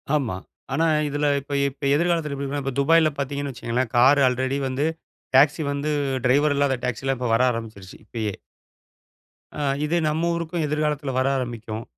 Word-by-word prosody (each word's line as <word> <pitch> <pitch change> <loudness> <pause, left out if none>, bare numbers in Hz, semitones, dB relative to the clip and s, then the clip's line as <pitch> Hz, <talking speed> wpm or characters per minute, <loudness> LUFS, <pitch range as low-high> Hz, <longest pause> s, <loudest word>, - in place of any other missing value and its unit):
ஆமா. 125 -11 -1 0.4
ஆனா 165 - +2 0.2
இதில 145 +1 -1 0.2
இப்ப 145 - -8 0.2
இப்ப 135 +1 -16
எதிர்காலத்தில 165 -3 0
எப்பிடி 140 0 -4
இருக்குன்னா, 140 +1 -3
இப்ப 135 -1 -3
துபாய்ல 160 +2 +4
பார்த்தீங்கன்னு 140 0 -3
வச்சிக்கங்களேன். 120 0 -2
கார் 135 +4 +6
ஆல்ரெடி 130 +2 0
வந்து 135 +3 -1 0.5
டாக்ஸி 145 +4 +5
வந்து 140 +2 -2 0.4
டிரைவர் 145 +3 +3
இல்லாத 140 -2 +2
டாக்சில்லாம் 130 +2 -1
இப்ப 125 -2 -1
வர 120 +3 +4
ஆரம்பிச்சிருச்சு 110 -5 -7
இப்பயே. 110 -3 -3 1.2
அ 150 - -6 0.2
இது 165 +3 0
நம்ம 165 +3 0
ஊருக்கும் 170 0 -2
எதிர்காலத்தில 150 -2 -1
வர 130 - +1
ஆரம்பிக்கும். 115 -3 -5
140 Hz, 155 wpm, -23 LUFS, 125-150 Hz, 1.2 s, கார்